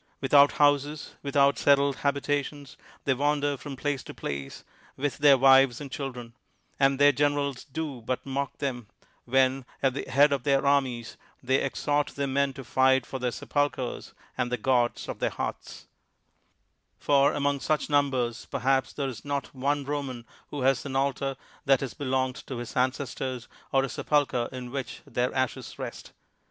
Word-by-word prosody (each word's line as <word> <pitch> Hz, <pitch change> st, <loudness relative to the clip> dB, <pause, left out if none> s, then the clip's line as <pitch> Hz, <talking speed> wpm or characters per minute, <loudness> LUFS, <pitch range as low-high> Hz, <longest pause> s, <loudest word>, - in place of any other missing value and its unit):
Without 140 Hz, +1 st, +5 dB
houses, 145 Hz, +1 st, +1 dB
without 140 Hz, 0 st, +2 dB
settled 140 Hz, -1 st, +3 dB
habitations, 145 Hz, 0 st, -2 dB, 0.3 s
they 135 Hz, -, +2 dB
wander 145 Hz, +1 st, +1 dB
from 135 Hz, +2 st, -8 dB
place 140 Hz, 0 st, -2 dB
to -, -, -10 dB
place 70 Hz, -1 st, -6 dB, 0.3 s
with 145 Hz, +1 st, -2 dB
their 145 Hz, -2 st, +7 dB
wives 135 Hz, -1 st, +6 dB
and 140 Hz, -3 st, -8 dB
children; 125 Hz, -5 st, -6 dB, 0.5 s
and 135 Hz, 0 st, +4 dB
their 145 Hz, +1 st, +6 dB
generals 145 Hz, -2 st, 0 dB
do 145 Hz, -3 st, -5 dB
but 125 Hz, +3 st, -3 dB
mock 140 Hz, 0 st, -3 dB
them 125 Hz, -6 st, -3 dB, 0.4 s
when, 130 Hz, +1 st, +2 dB, 0.2 s
at 135 Hz, -2 st, +3 dB
the 135 Hz, -, -5 dB
head 140 Hz, +2 st, +5 dB
of 140 Hz, -, -1 dB
their 135 Hz, +1 st, +2 dB
armies, 130 Hz, -5 st, +1 dB, 0.3 s
they 130 Hz, +1 st, +2 dB
ex 135 Hz, -, -4 dB
hort 145 Hz, 0 st, +1 dB
their 140 Hz, -, -1 dB
men 140 Hz, +1 st, +1 dB
to 135 Hz, -, -8 dB
fight 130 Hz, +1 st, +3 dB
for 130 Hz, -, -6 dB
their 125 Hz, 0 st, 0 dB
sepulchers 145 Hz, 0 st, -2 dB, 0.2 s
and 120 Hz, -, -1 dB
the 125 Hz, -, 0 dB
gods 120 Hz, 0 st, +1 dB
of -, -, -6 dB
their -, -, +1 dB
hearths: -, -, -6 dB, 1.1 s
for 140 Hz, 0 st, +3 dB
among 145 Hz, -1 st, 0 dB
such 150 Hz, +1 st, 0 dB
num 145 Hz, -1 st, +3 dB
bers, 120 Hz, -3 st, -2 dB
perhaps 135 Hz, 0 st, 0 dB
there 140 Hz, -2 st, -2 dB
is 130 Hz, -4 st, -7 dB
not 140 Hz, -1 st, -3 dB
one 140 Hz, +2 st, 0 dB
Roman 135 Hz, -4 st, -4 dB, 0.2 s
who 145 Hz, -, -5 dB
has 135 Hz, 0 st, +2 dB
an 140 Hz, -2 st, -5 dB
altar 135 Hz, 0 st, 0 dB, 0.3 s
that 135 Hz, -2 st, +4 dB
has 135 Hz, -, -4 dB
belonged 130 Hz, -2 st, -1 dB
to 130 Hz, -, -5 dB
his 120 Hz, +1 st, -7 dB
ancestors, 130 Hz, -1 st, -2 dB, 0.2 s
or 135 Hz, 0 st, +3 dB
a -, -, -1 dB
sepulcher 135 Hz, -5 st, 0 dB
in 125 Hz, -1 st, -7 dB
which 135 Hz, -1 st, -5 dB
their 125 Hz, +1 st, -1 dB
ashes 130 Hz, -1 st, -2 dB
rest. -, -, -7 dB
135 Hz, 170 wpm, -27 LUFS, 130-145 Hz, 1.1 s, their